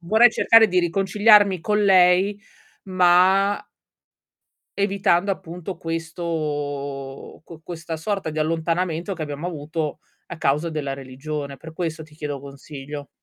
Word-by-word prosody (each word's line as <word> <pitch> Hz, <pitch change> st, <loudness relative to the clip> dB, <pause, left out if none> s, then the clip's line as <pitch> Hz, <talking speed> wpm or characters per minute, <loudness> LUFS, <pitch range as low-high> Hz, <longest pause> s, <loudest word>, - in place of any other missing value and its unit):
vorrei 220 Hz, +8 st, +5 dB
cercare 225 Hz, 0 st, +5 dB
di 180 Hz, 0 st, +2 dB
riconciliarmi 195 Hz, +2 st, +4 dB
con 210 Hz, +5 st, +1 dB
lei, 190 Hz, +1 st, +4 dB, 0.4 s
ma 185 Hz, +2 st, +3 dB, 1.1 s
evitando, 200 Hz, -1 st, +2 dB
appunto, 180 Hz, 0 st, -6 dB
questo 150 Hz, -5 st, -4 dB
qu 165 Hz, -1 st, -13 dB
questa 165 Hz, -1 st, -6 dB
sorta 195 Hz, +1 st, -3 dB
di 155 Hz, 0 st, -3 dB
allontanamento 165 Hz, +3 st, -1 dB
che 165 Hz, -, -6 dB
abbiamo 150 Hz, +2 st, -5 dB
avuto 155 Hz, -2 st, -4 dB, 0.3 s
a 170 Hz, -, -8 dB
causa 150 Hz, +2 st, 0 dB
della 145 Hz, -4 st, -3 dB
religione, 140 Hz, +2 st, -6 dB
per 160 Hz, +4 st, -11 dB
questo 160 Hz, -1 st, -4 dB
ti 150 Hz, -1 st, -17 dB
chiedo 145 Hz, -3 st, -5 dB
consiglio. 140 Hz, +1 st, -9 dB
165 Hz, 125 wpm, -22 LUFS, 150-185 Hz, 1.1 s, vorrei